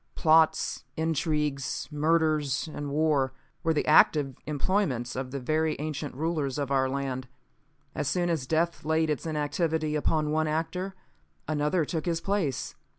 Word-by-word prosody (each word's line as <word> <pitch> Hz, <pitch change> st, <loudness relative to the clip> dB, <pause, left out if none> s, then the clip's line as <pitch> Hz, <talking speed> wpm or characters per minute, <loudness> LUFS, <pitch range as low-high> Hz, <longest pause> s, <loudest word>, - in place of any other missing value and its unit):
Plots, 160 Hz, -1 st, +3 dB
intrigues, 150 Hz, -3 st, -1 dB
murders 155 Hz, -2 st, +1 dB
and 145 Hz, -2 st, -5 dB
wars, 145 Hz, -2 st, +2 dB, 0.3 s
were 165 Hz, -, +1 dB
the 155 Hz, -, +1 dB
active 145 Hz, -3 st, +5 dB
employments 145 Hz, -, 0 dB
of 130 Hz, 0 st, -3 dB
the 140 Hz, +1 st, -4 dB
very 155 Hz, +4 st, 0 dB
ancient 150 Hz, -2 st, -4 dB
rulers 150 Hz, -3 st, -1 dB
of 140 Hz, -2 st, -2 dB
our 130 Hz, -1 st, +2 dB
land. 130 Hz, -1 st, -3 dB, 0.7 s
As -, -, -2 dB
soon 175 Hz, +3 st, +1 dB
as 160 Hz, -7 st, -1 dB
death 165 Hz, +3 st, 0 dB
laid 160 Hz, 0 st, +1 dB
its 150 Hz, -, -3 dB
inactivity 155 Hz, 0 st, 0 dB
upon 150 Hz, 0 st, +1 dB
one 155 Hz, 0 st, +1 dB
actor, 180 Hz, +5 st, -2 dB, 0.5 s
another 155 Hz, +2 st, +1 dB
took 160 Hz, +1 st, -3 dB
his 165 Hz, -1 st, +1 dB
place. 170 Hz, -7 st, -1 dB
155 Hz, 145 wpm, -28 LUFS, 140-160 Hz, 0.7 s, active